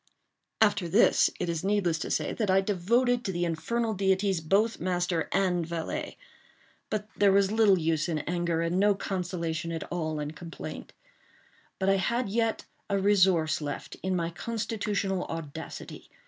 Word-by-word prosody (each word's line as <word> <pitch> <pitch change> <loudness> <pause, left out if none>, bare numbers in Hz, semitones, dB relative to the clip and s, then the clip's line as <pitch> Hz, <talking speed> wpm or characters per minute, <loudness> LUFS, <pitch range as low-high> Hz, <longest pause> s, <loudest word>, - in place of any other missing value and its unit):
After 205 -5 +3
this, 205 +8 +5
it 180 - -1
is 170 -1 -2
needless 190 -5 +1
to - - -4
say, - - -1
that 215 -4 -1
I 190 +1 +5
devoted 235 +6 +1
to 190 - -2
the 175 -1 -1
infernal 225 +8 -1
deities 190 -2 +1
both 205 +8 +2
master 175 -2 -1
and 180 -3 +1
valet:—but 210 - -7
there 200 -1 +4
was 195 0 +3
little 215 -3 +5
use 160 0 0
in 160 - 0
anger, 170 +1 -1
and 170 +2 0
no 205 0 +4
consolation 170 -4 -3
at 165 -1 -3
all 160 -3 -2
in 150 0 -3
complaint. 165 +2 -8 0.8
But 190 - -1
I 195 0 +4
had 235 +4 0
yet 225 +1 0 0.2
a 200 - +1
resource 185 -6 +3
left, 145 -1 -5
in 190 0 -1
my 170 -1 -1
constitutional 205 -2 -2
audacity. 165 -3 -7
190 Hz, 155 wpm, -28 LUFS, 170-205 Hz, 0.8 s, this